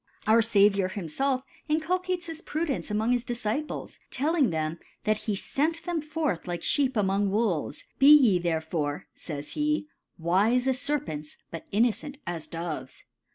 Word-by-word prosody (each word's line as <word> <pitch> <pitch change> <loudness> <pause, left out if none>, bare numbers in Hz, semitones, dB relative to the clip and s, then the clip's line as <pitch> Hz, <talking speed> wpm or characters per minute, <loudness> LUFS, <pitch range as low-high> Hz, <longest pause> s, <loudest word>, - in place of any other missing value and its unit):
Our 220 +2 +6
Saviour 200 -3 +4
himfelf 255 - -1 0.3
inculcates 355 +3 0
this 325 -1 -6
Pru 320 +1 -2
dence 275 -7 -2
an:K)ng 215 +3 +1
his 245 -1 +2
Diiiciples, 240 +4 -3
telling 295 -1 +2
theh^ 160 0 -2 0.2
that 215 0 +1
he 210 -3 0
fent 315 +10 -1
tbem 345 -4 -2
forth 300 - -2
like 175 -1 -3
Sheep 270 -4 +1
among 200 0 +2
JVolves: 195 -8 0 0.2
Be 275 +2 +8
ye 245 -12 +7
tbertfore^ 160 -3 -1
feys 145 -3 -6
he, 300 0 0 0.3
wife 200 +9 +2
as 260 -1 +1
SerfeniSj 275 - -3
but 165 - -8
inneanias 225 - -1
Do^s. 155 -6 -5
225 Hz, 145 wpm, -27 LUFS, -, 0.3 s, Be